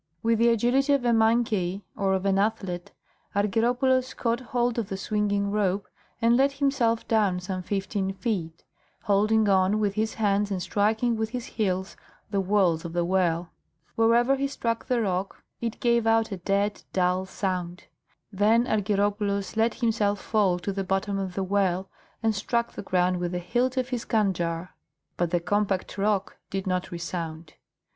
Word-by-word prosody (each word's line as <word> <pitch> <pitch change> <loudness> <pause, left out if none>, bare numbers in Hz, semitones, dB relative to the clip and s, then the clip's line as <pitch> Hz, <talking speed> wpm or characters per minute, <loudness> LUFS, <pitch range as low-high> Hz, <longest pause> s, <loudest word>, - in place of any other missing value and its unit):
With 230 -1 +2
the 235 +1 +5
agility 245 +5 +3
of 275 -3 +1
a 240 - +4
monkey 220 -4 +1
or 195 -1 +1
of 190 +1 -2
an 195 0 +2
athlete, 195 -4 -2 0.4
Argyropoulos 245 +5 +1
caught 230 0 0
hold 245 -2 -1
of 215 - -3
the 195 - -3
swinging 205 0 0
rope 200 -1 0 0.3
and 230 0 +4
let 275 +2 +3
himself 275 -5 +1
down 205 -5 +2
some 185 0 -4
fifteen 195 +1 -2
feet, 190 -6 -3 0.4
holding 215 +1 +3
on 190 +1 +3
with 205 -2 +1
his 220 +1 -1
hands 205 -2 +1
and 195 -2 -2
striking 220 +5 +1
with 220 0 -1
his 245 0 -5
heels 190 -3 -2 0.4
the 200 - +1
walls 185 -4 +2
of 170 -1 -6
the 175 0 +1
well. 175 -2 0 0.4
Wherever 235 +4 +4
he 275 +1 0
struck 230 -4 -3
the 245 -2 +1
rock 190 -1 -3 0.2
it 230 -2 -4
gave 235 -2 +2
out 225 0 +3
a 195 - -3
dead, 200 +3 0
dull 185 0 +1
sound. 180 -2 -3 0.5
Then 220 +4 +3
Argyropoulos 205 -2 0
let 225 +1 +2
himself 215 -4 +1
fall 200 -5 +1
to 180 +3 -3
the 195 0 -2
bottom 195 +1 -1
of 190 -2 -4
the 195 - -1
well 190 -1 0 0.3
and 225 -1 +3
struck 235 +3 -1
the - - -7
ground 180 -1 +1
with 175 0 -2
the - - -1
hilt 245 +8 -1
of 255 0 0
his 245 -3 -3
kandjar, 180 -5 0 0.5
but 175 -1 0
the 175 +1 +1
compact 200 +1 -1
rock 200 -1 0
did 195 -1 -3
not 185 -1 -1
resound. 170 -2 -5
205 Hz, 170 wpm, -26 LUFS, 185-230 Hz, 0.5 s, the